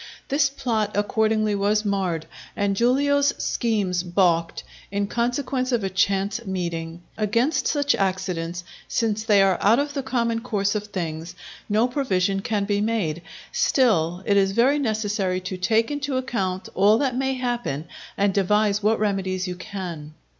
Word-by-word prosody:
This 280 0 +3
plot 220 -7 -2
accordingly 215 0 +1
was 205 +2 +1
marred, 185 -5 -1 0.3
and 200 -1 0
Giulio's 280 +5 +2
schemes 200 -6 0
baulked, 175 -2 +1 0.3
in 200 0 0
consequence 255 +3 -1
of 235 -4 +1
a 190 - -2
chance 195 +3 0
meeting. 170 -3 -4 0.2
Against 230 +8 +1
such 285 -1 +2
accidents, 180 -3 -2 0.2
since 220 -2 0
they 205 -3 +5
are 190 -1 +2
out 220 +4 +5
of 285 +1 -1
the 275 - -2
common 235 -3 -1
course 200 -4 0
of 210 -1 -3
things, 170 -4 -5 0.3
no 215 +4 +3
provision 195 -8 0
can 205 -1 -1
be 205 0 0
made. 205 -8 -1 0.3
Still 185 - +2
it 200 - +3
is 195 -1 +3
very 260 +7 +3
necessary 210 -6 -1
to 185 +1 -5
take 220 +7 +1
into 290 -2 -2
account 195 -8 -2
all 205 +3 +5
that 260 -1 0
may 265 +1 0
happen, 240 - -2 0.3
and 200 -1 +2
devise 205 +1 +2
what 215 +2 +2
remedies 190 -3 -1
you 180 - -3
can. 175 -6 -7
205 Hz, 155 wpm, -24 LUFS, 185-235 Hz, 0.3 s, they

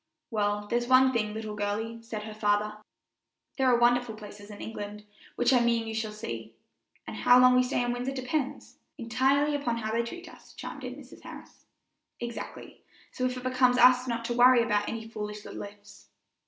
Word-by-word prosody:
"Well, 205 -1 0
there's 240 +3 -1
one 260 +1 +5
thing, 215 -3 0
little 215 -1 -5
girlie," 215 +3 -3
said 225 -2 -6
her 215 0 -7
father; 210 0 0 0.8
"there 265 - +3
are 245 -1 +5
wonderful 240 -1 +2
places 205 -1 -11
in 205 - -10
England, 210 -1 -7 0.3
which 245 +2 +3
I 250 - +6
mean 235 -1 +1
you 225 - -5
shall 220 -1 -2
see; 115 - -7 0.5
and - - -7
how 245 0 +6
long 255 0 +7
we 250 - +6
stay 250 -1 0
in 245 - -1
Windsor 245 +2 -3
depends 265 +1 -4
" - - -52
"Entirely 265 +5 +1
upon 245 -5 -1
how 220 -1 -3
they 230 +1 +1
treat 345 +10 -7
us," - - -16
chimed - - -8
in - - -5
Mrs. - - -14
Harris. - - -12 0.5
"Exactly; 235 -1 -7 0.3
so 255 - -2
it 250 0 -5
becomes 255 -1 +3
us 250 +1 +6
not 230 -1 -2
to 240 - -1
worry 245 0 +6
about 210 -3 0
any 225 0 -5
foolish 210 -1 -6
little - - -7
ifs." 205 0 -12
230 Hz, 195 wpm, -28 LUFS, 210-250 Hz, 0.8 s, long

